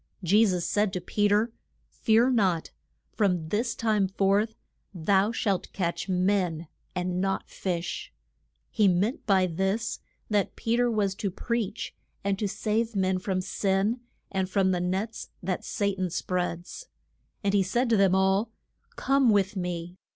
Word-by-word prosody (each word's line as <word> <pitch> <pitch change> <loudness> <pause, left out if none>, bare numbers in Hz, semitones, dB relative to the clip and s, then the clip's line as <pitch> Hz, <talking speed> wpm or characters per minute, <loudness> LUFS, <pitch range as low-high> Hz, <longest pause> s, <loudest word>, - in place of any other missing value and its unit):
Je 205 +6 +5
sus 180 -5 +1
said 205 -1 +1
to 185 - -2
Pe 205 +4 +1
ter, 210 +3 +2 0.4
Fear 230 +3 +3
not; 190 -9 +1 0.4
from 180 -7 +1
this 230 +4 0
time 215 -4 +1
forth 200 +3 +1 0.4
thou 190 +5 +2
shalt 200 -5 -1
catch 180 +1 -2
men 180 -3 +1 0.3
and 180 0 -1
not 195 0 -2
fish. 175 -2 -3 0.6
He 210 - +3
meant 195 +8 +1
by 190 -3 +4
this 190 +6 -1 0.3
that 205 -2 0
Pe 230 +1 0
ter 245 0 +3
was 205 -4 +1
to 200 0 -2
preach, 225 +2 -3 0.3
and 200 0 0
to 210 - 0
save 220 +3 -1
men 190 -1 +1
from 185 0 -1
sin, 195 +4 0 0.3
and 190 -1 -1
from 190 -1 +2
the 180 -1 0
nets 190 +5 -2
that 185 0 -2
Sa 200 -1 -1
tan 185 -1 -2
spreads. 180 - -3 0.6
And 200 0 +1
he 200 - +4
said 235 +7 +1
to - - +6
them 195 -2 +4
all, 190 +3 +2 0.5
Come 270 -2 +3
with 200 -1 +2
me. 175 -1 -4
195 Hz, 155 wpm, -27 LUFS, 185-215 Hz, 0.6 s, to